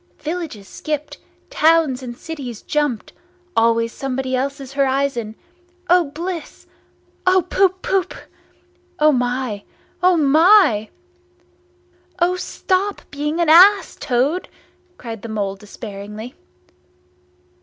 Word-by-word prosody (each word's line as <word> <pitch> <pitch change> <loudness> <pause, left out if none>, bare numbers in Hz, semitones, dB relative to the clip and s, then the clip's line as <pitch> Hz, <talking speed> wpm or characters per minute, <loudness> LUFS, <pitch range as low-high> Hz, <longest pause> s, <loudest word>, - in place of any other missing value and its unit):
Villages 310 - -5
skipped, 300 -1 -5 0.3
towns 320 - +3
and 240 -2 -7
cities 270 -9 -7
jumped—always 295 -4 -1
somebody 260 -1 -3
else's 275 +1 -3
horizon! 270 -5 0 0.6
O 355 -1 +5
bliss! 330 +3 -6 0.6
O 370 -1 +5
poop 375 0 +1
poop! 380 -1 0 0.8
O 305 -3 +5
my! 245 -4 -1 0.4
O 365 -1 +4
my!" 310 - +5 1.3
"O 355 +1 +2
stop 380 +2 -2
being 300 +3 -2
an 340 - +2
ass, 365 +3 +6
Toad!" 270 +9 -1 0.5
cried 225 -3 -7
the 230 - -8
Mole 200 -3 -2
despairingly. 210 +2 -9
285 Hz, 95 wpm, -20 LUFS, 240-350 Hz, 1.3 s, ass